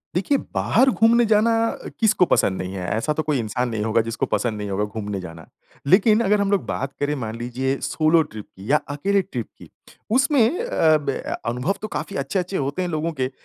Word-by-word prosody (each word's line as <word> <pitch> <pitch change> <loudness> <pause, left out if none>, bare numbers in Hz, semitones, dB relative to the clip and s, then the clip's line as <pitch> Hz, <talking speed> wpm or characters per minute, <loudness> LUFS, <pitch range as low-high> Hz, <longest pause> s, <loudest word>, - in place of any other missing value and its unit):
देखिए, 240 +10 +2 0.2
बाहर 260 +4 +3
घूमने 235 0 +4
जाना 220 +1 +3 0.5
किसको 215 -5 +4
पसंद 95 - +1
नहीं 95 +1 -5
है 90 -2 -4
ऐसा 115 +8 0
तो 155 - -2
कोई 150 -4 0
इंसान 120 +3 -2
नहीं 110 -2 -2
होगा 110 +1 +2
जिसको 115 +1 -2
पसंद 115 -3 -1
नहीं 105 -1 -5
होगा 100 +1 -1
घूमने 105 -1 -5
जाना। 80 -2 -10 0.4
लेकिन 210 +6 +5
अगर 210 +1 +3
हम 200 0 0
लोग 200 -3 +1
बात 135 +1 -3
करें 145 +1 0
मान 110 -5 -5
लीजिए 125 +3 -2
सोलो 160 +1 +3
ट्रिप 105 -1 -8
की 100 +7 -5
या 150 - +6
अकेले 195 +8 +1
ट्रिप 125 - -5
की - - -14 0.5
उसमें 275 0 +3 0.2
अ, 160 - +3
ब 150 - -5 0.4
अनुभव 125 +11 -1
तो 215 - -3
काफ़ी 200 - -5
अच्छे-अच्छे 180 +7 -2
होते 140 +6 -2
हैं 180 - -2
लोगों 160 0 -2
के 130 - +1
145 Hz, 205 wpm, -22 LUFS, -, 0.5 s, या